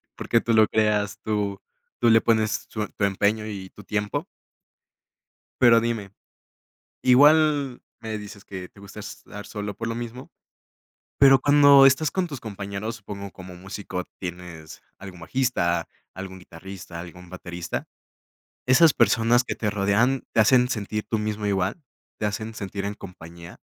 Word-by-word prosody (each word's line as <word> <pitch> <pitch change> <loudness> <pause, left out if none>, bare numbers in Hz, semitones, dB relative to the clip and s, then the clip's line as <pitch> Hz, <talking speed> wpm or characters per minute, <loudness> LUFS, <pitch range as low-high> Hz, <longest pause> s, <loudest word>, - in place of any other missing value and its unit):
porque 115 - +1
tú 115 - 0
lo 110 -1 +6
creas, 105 -2 0
tú 105 -2 -2 0.4
tú 120 - +5
le 115 0 +6
pones 110 -2 +1
tu 105 -1 -4
tu 100 - -1
empeño 105 +2 0
y 95 -3 -7
tu 105 - -14
tiempo. 105 0 -2 1.4
Pero 115 -2 +7
dime, 115 -4 -3 0.9
igual 145 0 +4 0.2
me 110 -1 -5
dices 105 -1 -11
que 95 -2 -8
te - - -20
gusta 100 +1 -10
estar 105 0 -10
solo, 105 -1 -5
por 115 +3 -5
lo 115 - -3
mismo, 120 +2 -7 0.9
pero 135 -1 +7
cuando 145 0 +7
estás 135 +3 +4
con 185 -2 -1
tus 140 -5 -7
compañeros, 100 +1 -5
supongo, 100 -2 -8
como 90 -1 -11
músico, 95 0 -6
tienes 90 -3 -8 0.2
algún 95 -2 -11
bajista, 85 -5 0 0.3
algún 95 0 -8
guitarrista, 90 0 -10
algún 90 0 -12
baterista, 85 -2 -6 0.8
¿esas 135 +4 +6
personas 120 +1 +3
que - - -4
te 105 -2 -1
rodean, 105 +6 +1
te - - +3
hacen 125 +3 +5
sentir 105 -2 -3
tú 110 - 0
mismo 105 0 -3
igual?, 100 - -1 0.4
¿te 105 - -1
hacen 110 +2 -4
sentir 100 -1 -5
en 100 - -3
compañía? 85 -3 -12
105 Hz, 150 wpm, -24 LUFS, 95-115 Hz, 1.4 s, Pero